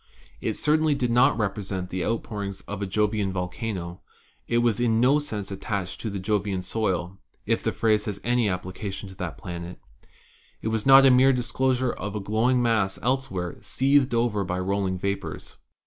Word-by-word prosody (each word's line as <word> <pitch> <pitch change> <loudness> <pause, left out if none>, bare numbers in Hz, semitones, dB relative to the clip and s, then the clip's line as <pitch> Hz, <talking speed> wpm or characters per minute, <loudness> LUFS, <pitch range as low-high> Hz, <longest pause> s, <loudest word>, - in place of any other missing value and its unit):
It - - -2
certainly 155 0 +2
did 125 -3 0
not 120 -2 +4
represent 95 -3 -3
the 95 -1 -2
outpourings 105 -3 -3
of 105 0 -7
a 100 - -1
Jovian 105 0 0
volcano; 90 -1 -4 0.5
it 115 - +1
was 120 -3 +2
in 115 -2 +2
no 135 +5 +4
sense 105 -9 -5
at 95 0 -6
tached 95 -4 -3
to 110 - -3
the 100 - -4
Jovian 100 -1 -1
soil 95 -2 -2
— - - -52
if - - +1
the - - 0
phrase 110 -2 +1
have 105 -2 -3
any 120 -2 +2
applica 95 +2 -4
tion 95 0 -7
to 95 - -12
that 90 -4 -5
planet; 85 0 -7 0.8
it 110 - -3
was 110 +2 -1
not 135 0 +9
a 135 - +7
mere 130 +2 +6
disclosure 130 0 0
of 105 +2 -5
a - - -1
glow 110 +5 +1
ing 125 -1 +3
mass 105 -5 +1
elsewhere 125 - -1
seethed 135 -2 +2
over 115 -4 +1
by 90 -1 -3
rolling 95 0 -1
vapors. 100 +2 -4
105 Hz, 190 wpm, -25 LUFS, 95-120 Hz, 0.8 s, not